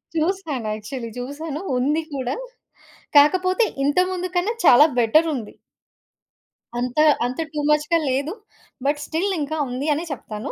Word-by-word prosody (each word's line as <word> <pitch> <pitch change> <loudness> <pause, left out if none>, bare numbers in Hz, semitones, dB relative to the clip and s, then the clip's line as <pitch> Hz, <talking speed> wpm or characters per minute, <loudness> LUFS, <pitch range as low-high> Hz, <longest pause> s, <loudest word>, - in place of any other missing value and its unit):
చూసాను. 315 - -1
యాక్చువలీ 230 +3 -6
చూసాను, 285 +4 -5 0.2
ఉంది 290 +6 +1
కూడా. 260 -2 -2 0.8
కాకపోతే 370 +8 +5 0.2
ఇంతకు 360 +6 +2
ముందు 365 0 -3
కన్నా 390 +6 +1
చాలా 285 +3 +8
బెటరుంది. 250 0 +2 1.3
అంత 250 +3 -2 0.3
అంత 250 +4 -4
టూ 300 - -2
మచ్‌గా 300 +2 +3
లేదు. 275 +6 -1 0.5
బట్ 290 +1 +1
స్టిల్ 355 +6 -1
ఇంకా 300 +1 -2
ఉంది 255 +4 -3
అనే 305 +3 -2
చెప్తాను. 215 -5 -6
295 Hz, 125 wpm, -22 LUFS, 255-330 Hz, 1.3 s, చాలా